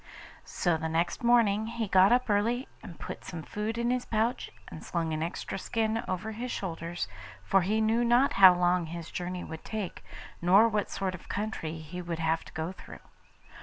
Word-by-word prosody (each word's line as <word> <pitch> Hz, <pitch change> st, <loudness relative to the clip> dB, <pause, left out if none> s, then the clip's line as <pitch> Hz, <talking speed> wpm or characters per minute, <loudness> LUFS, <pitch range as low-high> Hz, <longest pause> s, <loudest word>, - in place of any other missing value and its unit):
So 175 Hz, -3 st, 0 dB
the 160 Hz, 0 st, -3 dB
next 170 Hz, +7 st, -1 dB
morning 220 Hz, -3 st, +4 dB
he 230 Hz, -1 st, -3 dB
got 190 Hz, +1 st, +5 dB
up 250 Hz, +1 st, +3 dB
early, 230 Hz, +5 st, +1 dB
and 170 Hz, -, -11 dB
put -, -, -7 dB
some 165 Hz, -3 st, -7 dB
food 215 Hz, +7 st, -3 dB
in 235 Hz, +1 st, +1 dB
his 250 Hz, 0 st, 0 dB
pouch 225 Hz, +2 st, -1 dB, 0.2 s
and -, -, -9 dB
slung 165 Hz, -3 st, -2 dB
an 155 Hz, -, -2 dB
extra 170 Hz, +3 st, -4 dB
skin 225 Hz, +1 st, -1 dB
over 185 Hz, +4 st, -3 dB
his 240 Hz, +4 st, -5 dB
shoulders, 170 Hz, -, -4 dB, 0.4 s
for 195 Hz, -, +3 dB
he 210 Hz, +5 st, +1 dB
knew 225 Hz, +2 st, +2 dB
not 240 Hz, +3 st, +4 dB
how 190 Hz, -2 st, +8 dB
long 175 Hz, -1 st, +2 dB
his 170 Hz, 0 st, -7 dB
journey 180 Hz, 0 st, -4 dB
would 160 Hz, 0 st, -8 dB
take, 215 Hz, -5 st, -5 dB, 0.4 s
nor 195 Hz, +6 st, +6 dB
what 210 Hz, -3 st, -1 dB
sort 190 Hz, -1 st, -2 dB
of 185 Hz, -, -11 dB
country 200 Hz, -6 st, -3 dB
he 170 Hz, +4 st, -7 dB
would 170 Hz, -1 st, -4 dB
have 160 Hz, 0 st, 0 dB
to -, -, -14 dB
go 160 Hz, +3 st, -3 dB
through. 190 Hz, -, -12 dB
190 Hz, 195 wpm, -29 LUFS, 170-225 Hz, 0.4 s, how